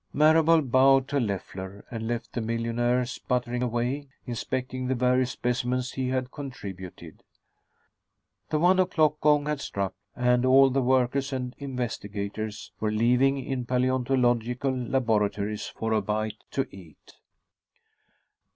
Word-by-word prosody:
Marable 160 +1 +5
bowed 135 +1 +4
to 145 - +1
Leffler 100 -3 -4
and 115 -2 -4
left 120 0 -4
the 120 - -2
millionaire 115 +2 0
sputtering 125 0 -2
away, 125 +4 -1 0.2
inspecting 130 +1 -3
the 130 - +1
various 125 +1 +2
specimens 125 0 -1
he 130 -1 -2
had 130 0 -2
contributed. 95 - -8 1.3
The 155 - +1
one 180 +4 +4
o'clock 155 -5 +2
gong 150 -1 +4
had 150 -2 -2
struck, 100 -5 -3 0.2
and 125 0 +2
all 135 +1 +6
the 135 +1 +1
workers 130 +2 +1
and 125 -2 -3
investigators 110 -5 -4
were 110 - 0
leaving 125 +5 +3
in 130 -2 -2
paleontological 125 0 +1
laboratories 110 -5 0
for 110 0 -3
a 110 - +2
bite 105 +1 -3
to 135 -1 -1
eat. 85 -5 -16
125 Hz, 125 wpm, -27 LUFS, 115-135 Hz, 1.3 s, all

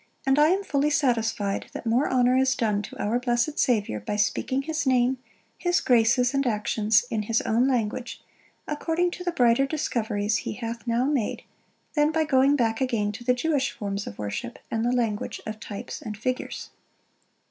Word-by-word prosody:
And 270 +2 +3
I 300 - +6
am 380 +4 +1
fully 290 -4 +1
satisfied, 225 -8 0
that - - -7
more 235 +5 +2
honor 250 -1 +3
is 265 0 +3
done 210 -4 0
to 205 - -9
our 225 +4 0
blessed 245 +4 0
Saviour, 210 - +1
by 105 - -4
speaking 260 +6 0
his 310 -1 -2
name, 255 0 +2 0.4
his 350 0 +2
graces, 245 +1 +3
and 275 -1 +1
actions, 215 0 +2
in 220 -2 0
his 225 +2 +1
own 235 +4 +2
language, 240 -1 -2 0.5
according 330 +4 0
to 360 - -7
the 355 - -1
brighter 250 -3 +3
discoveries 220 -8 -1
he - - -4
hath 230 +1 -6
now 235 +2 +1
made, 275 -7 -1 0.5
than 295 0 +3
by 320 0 +1
going 275 -1 +4
back 225 -3 0
again 230 -6 0
to 225 +4 -9
the 250 +1 +2
Jewish 275 0 0
forms 200 -1 -4
of 100 - -8
worship, 105 +2 -5
and 225 0 0
the 240 - +1
language 230 -4 -1
of 215 0 -6
types 205 -2 -7
and 210 -2 -6
figures." 255 +4 -4
245 Hz, 180 wpm, -26 LUFS, 220-275 Hz, 0.5 s, I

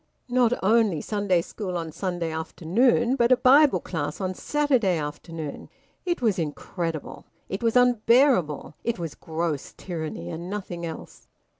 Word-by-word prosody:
Not 245 -2 +3
only 215 -5 +3
Sunday 200 -2 0
school 185 -3 -5
on 165 -2 -4
Sunday 175 -2 -3
afternoon, 230 +10 +1
but 240 -1 +2
a 255 - +7
Bible 275 +4 +6
class 150 -3 -4
on 185 -1 -2
Saturday 255 - +1
afternoon! 150 0 -6 0.4
It 345 -7 -1
was 210 -5 +2
incredible. 165 +1 -4 0.2
It 195 - -4
was 230 0 +1
unbearable. 240 - +3
It 235 - -1
was 165 -4 -5
gross 160 -3 -4
tyranny, 160 - -5
and 170 +2 -6
nothing 180 -4 -5
else. 160 - -10
185 Hz, 140 wpm, -25 LUFS, 165-235 Hz, 0.4 s, a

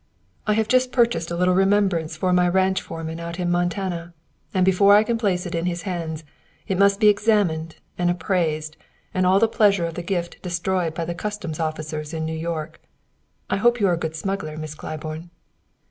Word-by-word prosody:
"I 210 - +4
have 220 0 +1
just 255 +1 +3
purchased 235 -9 +2
a 170 - -3
little 180 +1 +2
remembrance 190 -4 +2
for 180 +2 +1
my 180 0 +4
ranch 190 +1 +2
foreman 165 0 -6
out 170 +1 -6
in 175 -1 0
Montana, 175 -1 -2 0.4
and 185 -2 +2
before 200 +2 +6
I 210 - +6
can 235 +2 0
place 190 -5 0
it 175 - -5
in 170 +1 -1
his 175 0 -3
hands 165 -5 -4 0.4
it 190 -1 -1
must 200 0 +4
be 215 - +5
examined 205 -7 +2 0.2
and 175 0 +2
appraised 160 -4 -1 0.4
and 185 0 +2
all 190 +1 +5
the 225 - +4
pleasure 200 -5 +3
of 165 - -4
the 175 - -4
gift 175 -1 -3
destroyed 175 -2 -1
by 165 - -2
the 170 - -3
custom 205 -3 -4
officers 155 0 -4
in 160 0 -2
New 160 - -3
York. 160 -1 -4 0.7
I - - 0
hope 240 +4 +3
you 205 - +3
are - - +3
a - - 0
good 160 -1 -4
smuggler, 160 -2 -3
Miss 155 -1 -5
Claiborne." 155 +2 -7
175 Hz, 200 wpm, -23 LUFS, 160-195 Hz, 0.7 s, before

